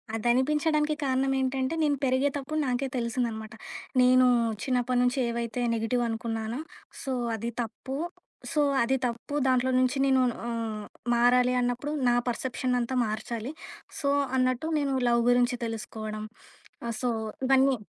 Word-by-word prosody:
అదనిపించడానికి 300 +6 +2
కారణం 270 0 +1
ఏంటంటే, 260 +1 0
నేను 295 -1 +3
పెరిగేతప్పుడు, 275 +3 0
నాకే 255 +2 0
తెలిసిందనమాట. 230 -2 -2 0.5
నేను 255 0 +6 0.4
చిన్నప్పటి 250 -1 +1
నుంచి 250 +2 +1
ఏవైతే, 235 +1 -3
నెగిటివనుకున్నానో 225 0 -1 0.4
సో, 270 - -2 0.2
అది 230 +2 -3
తప్పు. 250 +4 -6 0.6
సో, 300 - +2 0.2
అది 265 +3 +1
తప్పు. 240 +4 -5
దాంట్లో 255 0 +2
నుంచి 255 +2 +2
నేను 265 -1 +4 0.2
హ్మ్, 225 -3 -3 0.3
మారాలి 250 +1 +4
అన్నప్పుడు. 245 +4 -1 0.2
నా 240 - +3
పర్సెప్‌షనంతా 250 0 -1
మార్చాలి. 225 +4 -4 0.5
సో, 280 -2 0 0.3
అన్నట్టు 255 +3 +1
నేను 280 -2 0 0.2
లవ్ 235 0 +3
గురించి 245 0 +3
తెలుసుకోవడం, 215 -1 -5 0.6
ఆహ్, 230 - -2
సో, 245 - +1 0.4
ఇవన్నీ. 270 -1 +4
250 Hz, 120 wpm, -28 LUFS, 235-265 Hz, 0.6 s, నేను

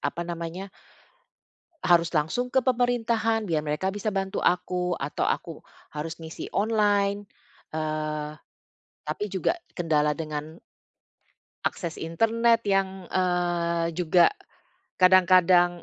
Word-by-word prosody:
apa 170 - -2
namanya 170 +3 -6 1.1
harus 170 -1 +3
langsung 160 +11 0
ke 265 - +4
pemerintahan 235 -3 +1
biar 155 -2 0
mereka 150 +5 -1
bisa 205 +2 -2
bantu 195 0 -2
aku, 180 0 +1
atau 140 +2 -2
aku - - -2 0.4
harus 160 +3 -5
ngisi 160 0 -8
online? 205 -1 +1 0.5
Eee, 155 -1 -3 0.7
tapi 155 +7 -2
juga 195 - 0 0.2
kendala 150 -4 +1
dengan 155 +1 -6 1.0
akses 170 -3 -2
internet 225 +7 +2
yang, 195 -2 0
eee, 175 -2 0
juga 175 - +4 0.6
kadang-kadang 180 -1 +5
180 Hz, 100 wpm, -26 LUFS, 160-200 Hz, 1.1 s, kadang-kadang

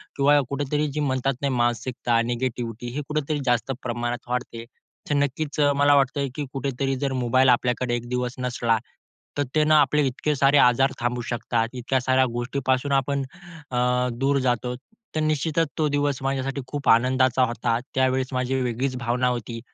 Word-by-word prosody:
किंवा 145 +1 +4
कुठेतरी 145 +2 -1
जे 150 - -3
म्हणतात 135 -1 0
नाही 140 -2 0
मानसिकता, 120 -1 0
निगेटिविटी 120 -1 -3
हे 150 - -1
कुठेतरी 150 0 -1
जास्त 125 +1 +1
प्रमाणात 120 0 -3
वाढते, 125 -2 -3 0.5
तर 145 - +1
नक्कीच 145 +2 -1
अ, 145 -1 +4
मला 145 0 +5
वाटतं 140 0 +1
की 150 - -3
कुठेतरी 135 0 -2
जर 135 +1 -2
मोबाईल 130 +2 +4
आपल्याकडे 125 0 +1
एक 120 0 -5
दिवस 125 0 -2
नसला 120 -2 0 0.6
तर 145 - +2
ते 155 - +4
न 155 - +1
आपले 150 -1 +4
इतके 145 +4 -1
सारे 140 +1 +4
आजार 135 +1 +4
थांबू 120 0 -1
शकतात, 115 -1 -1
इतक्या 130 +1 -1
साऱ्या 130 +1 +3
गोष्टीपासून 130 +2 -1
आपण 140 +1 -2 0.5
अ, 125 0 +1
दूर 135 +4 +1
जातो. 125 -1 -1 0.4
तर - - +1
निश्चितच 155 +1 +1
तो 155 -2 +2
दिवस 145 -2 0
माझ्यासाठी 135 0 -2
खूप 145 +1 -2
आनंदाचा 130 +2 +4
होता. 115 0 -1 0.2
त्यावेळेस 130 0 +2
माझी 130 +1 0
वेगळीच 125 +2 -1
भावना 125 +1 0
होती 120 -1 -3
130 Hz, 165 wpm, -24 LUFS, 120-140 Hz, 0.6 s, मला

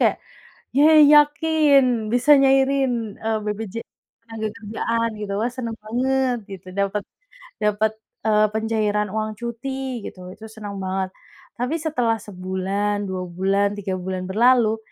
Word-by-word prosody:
kayak, - - +3 0.6
"Yayy, 300 +1 +7
yakin 290 -6 +4
bisa 290 +4 +6
nyairin, 270 -5 +2
eee, 220 0 -1
BPJ 210 0 -4 0.5
tenagakerjaan," 225 +1 -3
gitu. 205 -1 -4
"Wah, 230 - +1
seneng 230 -3 -4
banget," 255 +3 0
gitu, 185 -1 -9
"dapet, 200 0 -1 0.6
dapet, 210 0 +1 0.3
eee, 215 -1 +4
pencairan 215 -2 0
uang 215 +1 -2
cuti," 250 +3 -5
gitu, 180 -1 -9
itu 220 +4 -11
senang 210 -2 -8
banget. 190 0 -2 0.5
Tapi 250 +6 -1
setelah 250 -8 0
sebulan, 195 +2 -2
2 185 -1 -4
bulan, 195 +3 0
3 190 -2 -4
bulan 185 0 -4
berlalu, 230 +1 +4
220 Hz, 125 wpm, -22 LUFS, 200-250 Hz, 0.6 s, Yayy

